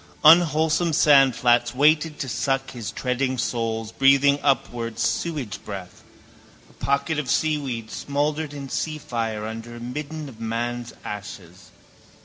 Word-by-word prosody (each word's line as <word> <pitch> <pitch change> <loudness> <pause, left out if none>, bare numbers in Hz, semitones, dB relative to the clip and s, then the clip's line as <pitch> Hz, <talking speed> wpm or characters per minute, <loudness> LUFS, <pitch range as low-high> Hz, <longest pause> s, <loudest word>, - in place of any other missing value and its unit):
Unwholesome 160 +1 +5
sandflats 125 -6 +4
waited 150 +2 +3
to 135 - -4
suck 135 +3 -1
his 115 -4 -6
treading 130 +1 -1
soles, 115 -2 -2
breathing 140 +3 +4
upward 120 -5 -1
sewage 145 - -2
breath, 95 -3 -8 0.6
a - - -22
pocket 140 +2 -1
of 140 -5 -4
seaweed 135 -8 -1
smouldered 145 +2 -2
in 140 -1 -7
seafire 120 -9 -3
under 115 +1 -7
a - - -9
midden 150 +5 -6
of 120 -5 -12
man's 120 +1 -3
ashes. 95 -3 -8
135 Hz, 125 wpm, -24 LUFS, 115-150 Hz, 0.6 s, Unwholesome